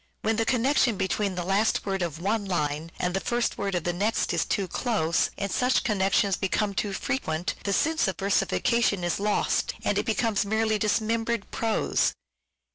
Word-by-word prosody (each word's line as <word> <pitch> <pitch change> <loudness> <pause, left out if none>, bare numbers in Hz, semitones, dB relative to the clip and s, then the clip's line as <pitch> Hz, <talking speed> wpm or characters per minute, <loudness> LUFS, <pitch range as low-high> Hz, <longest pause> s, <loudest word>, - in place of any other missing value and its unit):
When 220 0 +1
the 225 - +1
connection 250 -2 +2
between 190 +1 -1
the 175 - -2
last 195 +4 +1
word 195 -1 -1
of 165 -2 -3
one 205 +4 0
line 155 -3 -2
and 180 0 -1
the 195 - +1
first 240 +4 -1
word 195 -2 -1
of 175 - -1
the 175 - -1
next 210 +6 0
is - - +1
too 195 -3 -1
close, 170 -6 0
and 200 -1 -3
such 250 +5 +2
connections 195 -3 +2
become 200 +1 -1
too 205 +1 -1
frequent, 190 - -2
the 200 - 0
sense 315 - +2
of 190 - -2
versifica 205 +4 +1
tion 200 -6 +1
is 175 +1 0
lost 210 +1 0
and - - +1
it - - -3
becomes 220 -2 +1
merely 220 +1 0
dismembered 225 +1 0
prose. 225 -1 +1
205 Hz, 185 wpm, -26 LUFS, 185-225 Hz, -, connection